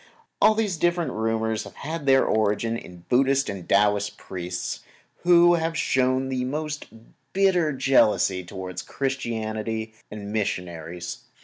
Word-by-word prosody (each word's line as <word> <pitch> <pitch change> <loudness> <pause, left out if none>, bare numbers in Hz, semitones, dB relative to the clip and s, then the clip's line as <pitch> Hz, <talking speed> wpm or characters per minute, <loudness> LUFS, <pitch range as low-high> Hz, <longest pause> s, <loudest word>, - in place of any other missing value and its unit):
All 215 +1 +6
these 210 -5 0
different 170 -3 +1
rumors 110 0 -1
have - - -12
had 155 0 -5
their 135 0 +5
origin 110 +1 +1
in 90 -6 -10
Buddhist 135 +2 +3
and 95 -3 -6
Taoist 105 0 +2
priests, 90 -1 -5 0.4
who 175 0 +6
have 165 -1 0
shown 130 -1 +1
most 150 +1 -4 0.5
bitter 185 -5 +3
jealousy 130 -8 +3
toward 90 0 -6
Christianity 110 -4 -3 0.2
and 105 -1 -7
missionaries. 90 -4 -3
115 Hz, 120 wpm, -25 LUFS, 105-150 Hz, 0.5 s, All